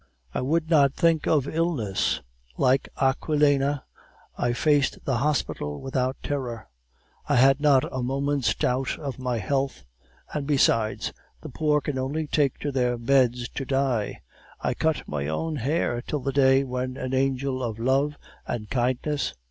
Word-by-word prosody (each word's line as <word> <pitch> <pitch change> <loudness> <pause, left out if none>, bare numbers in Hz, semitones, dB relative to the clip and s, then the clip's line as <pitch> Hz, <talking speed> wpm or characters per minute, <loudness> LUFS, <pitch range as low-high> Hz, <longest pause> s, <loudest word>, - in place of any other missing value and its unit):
"I - - -1
would 160 +5 0
not 140 -4 +4
think 165 -3 +2
of 145 -4 +2
illness. 155 - 0 0.4
Like 130 +2 +2
Aquilina, 145 0 +2 0.5
I 120 - 0
faced 145 +2 +1
the 130 -3 +1
hospital 115 - -1
without 130 -1 -1
terror. 125 - -4 0.6
I - - +3
had 135 +3 +5
not 140 -3 +5
a 130 - -2
moment's 135 -1 0
doubt 130 +1 0
of 140 -4 -6
my 125 -2 -1
health, 135 - -1 0.5
and 145 -2 -3
besides, 115 -6 +2 0.3
the - - -8
poor 150 +2 +1
can 140 -3 -3
only 145 +5 -2
take 145 -3 +1
to 145 - -2
their 125 -2 +1
beds 125 0 +2
to - - -5
die. 135 -5 -1 0.4
I - - -1
cut 160 -1 -1
my 70 -1 -3
own 155 - -2
hair 125 -2 0
till 150 +3 -3
the 135 +1 -2
day 135 0 +5
when 130 0 -3
an 130 0 -4
angel 135 0 0
of 115 -3 -3
love 135 +5 +1 0.3
and 105 -3 -4
kindness... 130 +4 0
135 Hz, 155 wpm, -25 LUFS, 125-145 Hz, 0.6 s, had